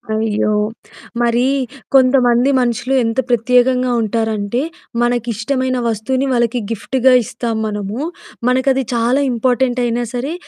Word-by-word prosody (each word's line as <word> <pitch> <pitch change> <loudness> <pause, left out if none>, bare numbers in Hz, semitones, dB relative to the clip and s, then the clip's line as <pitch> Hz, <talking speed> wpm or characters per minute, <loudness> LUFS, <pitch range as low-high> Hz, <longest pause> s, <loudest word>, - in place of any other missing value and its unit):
అయ్యో! 215 -1 0 0.7
మరీ 240 +1 +2 0.5
కొంతమంది 255 -1 +4
మనుషులు 245 +2 -1
ఎంత 225 +3 -1
ప్రత్యేకంగా 250 +1 +2
ఉంటారంటే, 220 +1 -1 0.4
మనకిష్టమైన 245 +2 -1
వస్తువుని 245 +5 -1
వాళ్ళకి 240 0 +1
గిఫ్ట్‌గా 260 +3 +2
ఇస్తాం 235 0 -4
మనము. 210 +2 -4 0.5
మనకది 260 +1 +2
చాలా 240 +4 +1
ఇంపార్టెంటయినా 245 0 0
సరే 265 +6 -3
245 Hz, 95 wpm, -17 LUFS, 230-255 Hz, 0.7 s, కొంతమంది